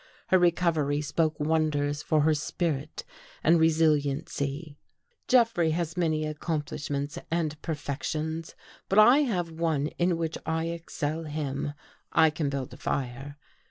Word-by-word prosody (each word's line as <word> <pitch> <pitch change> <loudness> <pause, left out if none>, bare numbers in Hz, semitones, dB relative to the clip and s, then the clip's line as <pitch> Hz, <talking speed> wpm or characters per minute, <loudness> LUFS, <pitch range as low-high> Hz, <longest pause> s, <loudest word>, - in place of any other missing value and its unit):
Her 185 - +5
recovery 165 -5 +2
spoke 155 +1 0
wonders 150 -2 +1
for 155 -1 +2
her 155 +1 +4
spirit 150 -1 -2 0.4
and 165 +1 +5
resiliency. 150 -1 +1 0.5
Jeffrey 230 -10 +4
has 170 -2 -2
many 155 -3 0
accomplishments 150 -1 -3
and 155 -2 -1
perfec 145 -3 -4
tions, 160 +1 -3 0.3
but 195 - +1
I 240 +6 +8
have 185 - 0
one 160 -3 0
in 175 -1 +2
which 165 -1 -3
I 160 +1 -1
excel 165 -1 -4
him. 145 -1 -3 0.4
I 160 - +5
can 150 -2 -1
build 135 -2 -4
a - - -10
fire. 135 +2 -4
155 Hz, 130 wpm, -28 LUFS, 145-165 Hz, 0.5 s, I